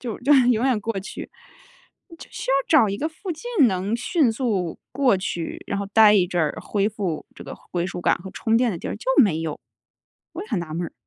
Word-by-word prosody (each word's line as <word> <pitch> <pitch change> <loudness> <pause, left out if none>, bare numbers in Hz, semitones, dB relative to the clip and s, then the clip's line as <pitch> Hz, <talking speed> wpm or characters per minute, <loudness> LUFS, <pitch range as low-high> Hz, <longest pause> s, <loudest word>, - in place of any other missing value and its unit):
就 235 -4 -5
就 280 +4 +3
是 250 -2 +5
永 240 +2 +2
远 240 -5 +1
过 225 -2 -3
去， 190 - -8 0.9
就 - - -12
需 - - -4
要 - - +4
找 275 -10 +5
一 200 - -2
个 310 - -2
附 350 +4 -8
近 335 - +2
能 195 +2 -2
迅 255 0 +1
速 210 - -2
过 255 -6 +3
去， 175 -3 -4
然 200 - -2
后 200 - -3
待 210 +1 +6
一 185 -4 +4
阵 175 0 -1
儿， 150 - -2
恢 205 0 0
复 195 -7 -4
这 - - -10
个 - - -8 0.2
归 175 -1 -1
属 180 - -6
感 - - +2
和 190 +2 -10
充 225 0 0
电 240 -2 +2
的 170 - -5
地 - - -6
儿， - - -4
就 215 - -13 0.2
没 175 -8 +1
有， 160 -2 -4 0.7
我 345 +4 -6
也 - - -11
很 220 - -1
纳 160 -2 -6
闷 175 +1 -2
儿。 - - -11
215 Hz, 260 characters per minute, -23 LUFS, 185-255 Hz, 0.9 s, 待